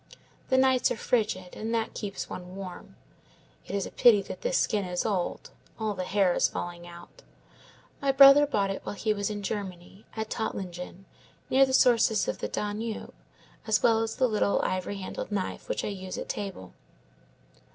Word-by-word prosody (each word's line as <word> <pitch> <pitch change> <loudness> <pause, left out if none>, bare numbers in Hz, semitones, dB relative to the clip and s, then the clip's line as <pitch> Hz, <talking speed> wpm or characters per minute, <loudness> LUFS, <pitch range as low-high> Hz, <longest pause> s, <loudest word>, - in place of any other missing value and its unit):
The 260 - +3
nights 260 -1 +4
are - - -2
frigid, 210 -8 -1
and 225 +2 -3
that 225 -1 -1
keeps 200 -2 -5
one 180 +1 -8
warm. 190 -2 -9 0.7
It - - -4
is 200 - -1
a - - -8
pity 225 -5 +5
that - - -8
this - - +1
skin 210 -2 +1
is 180 -1 -2
old; 195 -5 -2 0.3
all 220 -2 -1
the 185 -2 -4
hair 190 -2 +2
is - - +3
falling 175 0 -6
out. 175 - -13 0.8
My 275 -1 +2
brother 275 +2 +8
bought 200 -7 0
it 195 - -5
while - - -5
he 215 +1 0
was 200 0 -2
in 205 -1 -5
Germany, 190 -1 -6
at 220 -1 -4
Tottlingen, 185 -3 -5 0.5
near 270 +1 +6
the 260 - -3
sources 230 -5 +4
of - - -3
the - - -2
Danube, 210 +2 -4 0.5
as 215 -1 +2
well 225 -1 +5
as 225 0 -2
the 255 - +2
little 210 -3 +1
ivory 185 +2 -2
handled 195 +2 -6
knife 195 -2 -3
which - - -1
I - - -2
use 190 -2 -6
at - - -5
table. 195 - -6
205 Hz, 185 wpm, -28 LUFS, 185-225 Hz, 0.8 s, brother